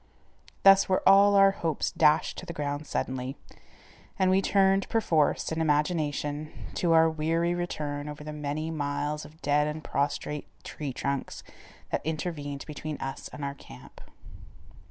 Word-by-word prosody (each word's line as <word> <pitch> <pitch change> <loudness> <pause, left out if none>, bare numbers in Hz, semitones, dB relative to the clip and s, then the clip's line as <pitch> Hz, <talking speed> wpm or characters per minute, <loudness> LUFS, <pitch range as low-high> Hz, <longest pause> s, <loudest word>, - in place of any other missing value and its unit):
Thus 195 0 +7
were 185 - +1
all 200 +1 +7
our 195 0 +7
hopes 165 -6 -2
dashed 155 0 +2
to - - -10
the 170 - -5
ground 145 0 -3
suddenly, 130 +1 -3 0.8
and 185 -1 +3
we 190 +1 +4
turned 195 0 +2
perforce, 165 -12 +1
in 160 0 -1
imagination, 150 -1 0 0.2
to 170 -2 +1
our 165 0 +6
weary 165 +2 0
return 150 -4 -3
over 150 0 -8
the 150 0 -6
many 150 +2 -3
miles 150 0 -2
of 155 +2 -16
dead 145 +1 +2
and 150 +1 -5
prostrate 145 +1 -2 0.2
tree 145 -3 -5
trunks 140 +2 -3 0.5
that - - -1
intervened 150 -3 -4
between 150 0 -6
us 135 0 -5
and 145 - -6
our 140 - -3
camp. 65 - -14
150 Hz, 150 wpm, -28 LUFS, 145-170 Hz, 0.8 s, Thus